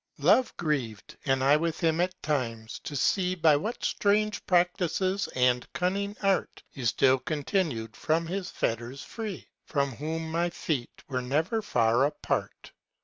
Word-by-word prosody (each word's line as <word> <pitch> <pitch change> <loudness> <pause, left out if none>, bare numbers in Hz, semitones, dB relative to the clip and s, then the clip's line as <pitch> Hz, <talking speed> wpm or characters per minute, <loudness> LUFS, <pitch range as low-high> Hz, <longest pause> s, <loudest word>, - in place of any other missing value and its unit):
Love 255 - +4
grieved, 135 -10 -2
and 135 -1 +2
I 140 +2 +6
with 165 +1 -2
him 165 -1 +2
at 185 +1 -2
times, 115 -7 -2
to 145 - -5
see 185 +5 +1
By 160 -4 +5
what 210 +11 -3
strange 210 0 +1
practices 185 +1 +1
and 125 -1 +2
cunning 200 +3 -1
art, 195 -1 0
You 125 -4 -2
still 130 +4 +4
continued 145 - -2
from 165 +2 0
his 185 +2 -3
fetters 120 +4 -3
free, 215 -6 -6 0.2
From 140 -1 0
whom 160 +2 -3
my 170 +2 +1
feet 145 -7 -4
were 130 -2 -2
never 155 - 0
far 120 - +2
apart. 145 - -3
160 Hz, 145 wpm, -28 LUFS, 130-185 Hz, 0.2 s, I